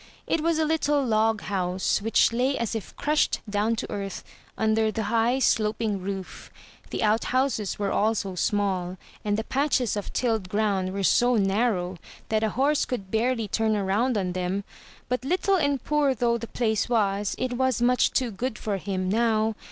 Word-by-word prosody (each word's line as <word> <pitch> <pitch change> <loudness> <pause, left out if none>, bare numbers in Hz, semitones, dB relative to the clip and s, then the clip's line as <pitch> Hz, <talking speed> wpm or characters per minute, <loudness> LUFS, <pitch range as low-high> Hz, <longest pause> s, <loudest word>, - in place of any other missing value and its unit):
It 325 - 0
was 330 0 +1
a 315 - +2
little 295 -3 +1
log 220 -2 +2
house, 185 -1 -1
which 225 +2 +3
lay 255 +3 +1
as 235 -2 -2
if 225 -3 -6
crushed 300 +1 +1
down 210 +2 0
to 225 - -5
earth, 195 -2 -5 0.3
under 220 0 +2
the 220 +1 -2
high, 230 +3 +3
sloping 215 -4 +1
roof. 190 0 -6 0.4
The - - -2
outhouses 225 0 +1
were 200 -1 -1
also 210 -2 0
small; 185 -1 -1 0.3
and 205 -1 0
the 220 - -1
patches 265 -3 0
of 205 - -4
tilled 220 -7 -1
ground 200 -2 0
were 195 +1 -3
so 245 +5 +4
narrow 195 -3 +1 0.3
that 220 -1 +1
a 220 - +1
horse 285 +3 +3
could 200 -7 -5
barely 230 0 0
turn 220 +2 +1
around 210 +5 +1
on 185 -3 -1
them. 185 +2 -2 0.4
But 250 0 -2
little 365 +7 +1
and 285 -5 0
poor 295 -3 +2
though 235 0 +1
the 230 - -6
place 220 -1 0
was, 205 -3 +1
it 255 0 -2
was 260 -1 +1
much 245 +1 +3
too 255 -3 0
good 225 +3 -3
for 205 -2 -2
him 185 -1 -3
now. 220 +1 +2
220 Hz, 175 wpm, -26 LUFS, 200-250 Hz, 0.4 s, so